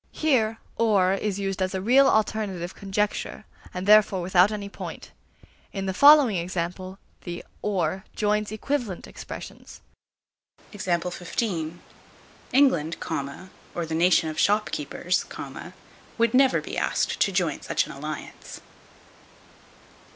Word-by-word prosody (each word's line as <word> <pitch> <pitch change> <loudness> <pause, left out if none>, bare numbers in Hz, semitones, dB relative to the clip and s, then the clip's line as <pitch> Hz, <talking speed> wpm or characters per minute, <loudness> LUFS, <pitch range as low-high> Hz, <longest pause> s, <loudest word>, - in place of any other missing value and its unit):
Here 230 -8 +1 0.2
"or" 200 -5 +3
is 200 0 -2
used 195 -1 -3
as 185 +1 -1
a - - -1
real 255 +8 +5
alternative 205 -6 0
conjecture, 200 +1 -2 0.3
and 180 +1 -5
therefore 210 -2 +5
without 180 +2 +4
any 205 -1 -4
point. 200 - -8 0.6
In 195 -1 -3
the 190 - -1
following 280 -3 +7
examples, 180 +2 -4 0.3
the 175 -1 -6 0.2
"or" 195 -1 -1
joins 210 0 0
equivalent 220 -3 -3
expressions: - - -10 2.7
England, 250 - +3 0.8
or 170 - -2
the 160 - -5
nation 170 0 +3
of 155 - -4
shopkeepers, 185 -4 0 0.9
would 230 -1 +2
never 265 0 +4
be - - -4
asked - - 0
to 200 - +3
join 180 -5 0
such - - 0
an - - -9
alliance. 150 +2 -7
195 Hz, 115 wpm, -25 LUFS, 180-215 Hz, 2.7 s, following